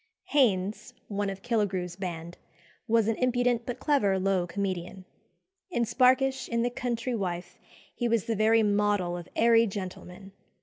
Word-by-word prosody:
Haines, 210 -6 +1
one 205 -1 -1
of 195 0 -7
Killigrew's 195 -7 -1
band, 175 -2 -6 0.5
was 225 -2 +3
an 225 - +1
impudent 245 -1 +1
but 245 0 -3
clever 240 -12 +2
low 190 -2 +1
comedian. 185 0 -4 0.6
In 240 -10 0
Sparkish, 260 +3 +2
in 235 0 0
"The 245 - 0
Country 245 0 -3
Wife," 180 -5 -4 0.3
he 240 - -1
was 230 -4 +1
the 225 - -1
very 220 +2 +4
model 205 -4 +1
of 175 -1 -8
airy 230 0 +5
gentlemen. 190 -1 -7
210 Hz, 145 wpm, -28 LUFS, 190-240 Hz, 0.6 s, airy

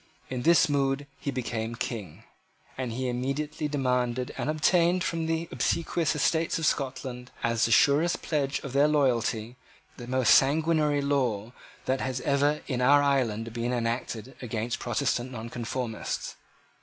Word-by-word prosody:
In 125 -1 -2
this 170 +5 +5
mood 140 -1 0
he - - -4
became 115 -3 -3
King; 105 -9 -5 0.5
and 130 -2 -3
he 130 +3 -2
immediately 140 +5 -2
demanded 125 -3 -1
and - - -3
obtained 170 +3 +3
from 165 -2 -2
the 165 +1 -1
obsequious 170 -2 0
Estates 160 +2 +1
of 160 - -1
Scotland 130 -3 -2
as 115 -1 +2
the 115 - -1
surest 145 - +4
pledge 140 -3 0
of 140 - -7
their 140 +2 +5
loyalty, 120 -5 +1 0.4
the 120 - -8
most 130 -1 +4
sanguinary 150 0 +3
law 125 -6 0 0.3
that 130 +1 0
has 130 -1 -2
ever 145 +2 +1
in 125 -3 -2
our 145 +3 +5
island 115 -5 0
been 120 +1 -2
enacted 115 0 -3
against 115 -1 -3
Protestant 120 +1 -1
Nonconformists. 115 0 -4
130 Hz, 145 wpm, -27 LUFS, 120-145 Hz, 0.5 s, this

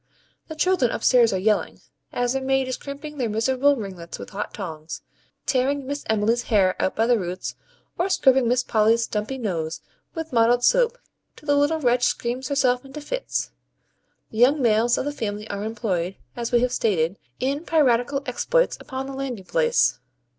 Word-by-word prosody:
The 315 - -7
children 310 -6 +2
upstairs 240 -1 +4
are 190 - 0
yelling, 210 +3 0 0.3
as 245 0 0
their 270 - -1
maid 270 0 +1
is 255 - -2
crimping 290 +1 -8
their 240 -3 0
miserable 260 +6 +2
ringlets 185 -7 -7
with - - -9
hot 200 - -4
tongs, 160 -5 -7 0.4
tearing 270 +2 +1
Miss 285 +2 -4
Emmy's 220 +2 +2
hair 195 -6 +2
out 190 - 0
by 225 - +2
the 240 -1 +3
roots, 180 0 -4 0.5
or 360 +3 +1
scrubbing 265 -9 +4
Miss 250 +1 +2
Polly's 225 +1 +3
dumpy 215 +5 -3
nose 165 -8 -3 0.4
with 325 -4 -5
mottled 240 +1 +4
soap - - +3 0.4
till - - -17
the 290 -1 +3
little 290 +3 +2
wretch 245 -3 +2
screams 250 +2 -1
herself 255 -2 +1
into 275 +2 -9
fits. - - -3 0.8
The 220 - -5
young 270 +5 +5
males 235 -1 +3
of - - -2
the 290 - -1
family 210 -6 -4
are 200 0 -4
employed, 195 -5 -2 0.2
as 235 -1 -3
we 240 -1 +4
have 250 0 +1
stated, 190 -7 0 0.2
in 280 +4 -1
piratical 275 -4 +2
exploits - - +1
upon 265 0 -5
the 275 - -7
landing 260 -7 -5
place. 485 - +2
245 Hz, 175 wpm, -24 LUFS, 215-280 Hz, 0.8 s, young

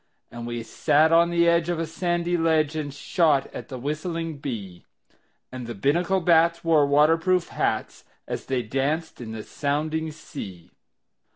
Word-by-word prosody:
And 120 0 -7
we 120 -1 -4
sat 155 +7 +2
on 170 +1 +5
the 170 0 +3
edge 170 0 +3
of 175 - 0
a 165 - -1
sandy 175 +1 -1
ledge 160 -2 +2
And 150 -2 -3
shot 145 0 +1
at - - -7
the 130 - -7
whistling 155 +3 -4
bee; 100 -10 -6 0.7
And 125 -2 -7
the 120 - -5
Binnacle 170 - +1
bats 170 0 +3
wore 155 -3 +4
water 150 +3 +5
proof 180 0 +1
hats - - -2 0.2
As - - -5
they 130 -2 0
danced 140 +7 -2
in 110 -2 -7
the 110 -1 -6
sounding 155 +2 -2
sea. 120 - -9
155 Hz, 165 wpm, -25 LUFS, 135-170 Hz, 0.7 s, on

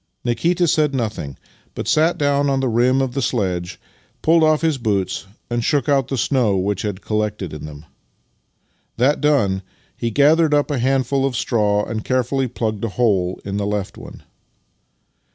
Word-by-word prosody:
Nikita 170 +9 +1
said 150 -3 +2
nothing, 105 - -3 0.4
but - - -5
sat 160 +3 +3
dovrn 145 -1 +1
on 135 -1 +1
the 135 - 0
rim 125 +3 +2
of 130 -2 -3
the 135 - -1
sledge, 90 -7 -2 0.4
pulled 165 0 +4
off 155 -1 +3
his 160 -4 +1
boots, 100 -4 -1 0.2
and 120 -1 -2
shook 145 -2 +1
out 135 -3 +2
the 135 - -3
snow 120 -6 +1
which 95 +1 -1
had 105 -3 -4
collected 105 -5 -2
in 75 0 -7
them. 75 0 -10 1.1
That 130 +5 +2
done, 120 -11 +2 0.3
he 115 - -2
gathered 150 +5 +4
up 145 +1 +1
a 140 - -1
handful 135 +1 +1
of 135 -2 0
straw 105 -4 +1
and 110 -1 -4
carefully 130 +1 0
plugged 110 -3 -3
a 115 - 0
hole 100 -5 0
in 100 0 -3
the 100 0 -1
left 105 -2 -3
one. - - -12
120 Hz, 170 wpm, -20 LUFS, 105-140 Hz, 1.1 s, pulled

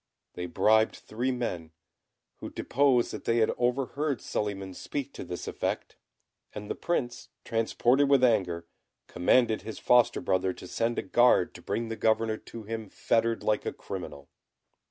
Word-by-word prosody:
They 90 0 -5
bribed 110 +5 +3
three 120 +4 -3
men, 90 -10 -4 0.6
who - - -7
deposed 130 -3 +2
that - - -7
they 115 - +2
had 110 - +3
overheard 135 +3 0
Suliman 100 -2 -3
speak 140 +7 -5
to - - -7
this 90 0 -6
effect; - - -3 0.6
and 105 0 -6
the - - +1
Prince, 125 -8 -3 0.2
transported 120 +4 +2
with 140 -2 +5
anger, 90 -8 +2 0.4
commanded 110 +5 +2
his 110 - -7
foster 120 -1 +4
brother 95 0 0
to 90 - -11
send 115 +5 -1
a - - -1
guard 120 -2 +4
to - - -11
bring 115 0 -3
the 115 - -3
governor 110 0 +1
to 115 0 -10
him 110 -1 -5
fettered 115 +2 0
like 105 -1 +1
a - - -2
criminal. 70 0 -8
115 Hz, 155 wpm, -28 LUFS, 100-125 Hz, 0.6 s, with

